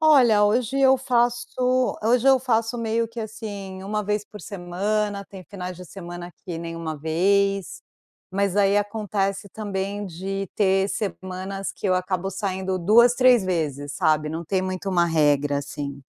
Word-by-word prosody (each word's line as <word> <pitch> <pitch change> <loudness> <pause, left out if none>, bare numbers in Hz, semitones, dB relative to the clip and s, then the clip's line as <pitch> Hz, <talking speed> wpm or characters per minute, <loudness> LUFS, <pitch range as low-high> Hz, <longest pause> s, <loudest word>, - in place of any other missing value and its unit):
Olha, 250 -9 +6
hoje 240 +5 +1
eu 265 0 +6
faço 245 +1 +1 0.6
hoje 240 +3 +3
eu 265 -1 +6
faço 235 -2 0
meio 230 0 0
que 230 +1 -10
assim, 205 -4 -6
1 210 +2 -2
vez 210 +1 -1
por 210 - -12
semana, 200 +3 -2
tem 190 -1 -11
finais 180 -2 -7
de 180 - -10
semana 175 -1 -8
que 175 -3 -5
nem 165 0 -6
uma 160 -2 -4
vez, 195 +5 +1 0.5
mas 200 0 0
aí 200 0 +4
acontece 205 -1 -1
também 200 0 -4
de 195 +2 -4
ter 195 -1 +2
semanas 195 -1 -4
que - - -5
eu 185 - +3
acabo 185 +1 -1
saindo 190 -1 -2
2, 230 +7 +5
3 250 -4 +5
vezes, 145 -6 -2
sabe, 155 -1 +1
não 165 +2 -4
tem 185 +3 0
muito 185 +1 -3
uma 175 -2 +3
regra 145 -3 +2
assim. 140 0 -6
195 Hz, 160 wpm, -24 LUFS, 180-215 Hz, 0.6 s, Olha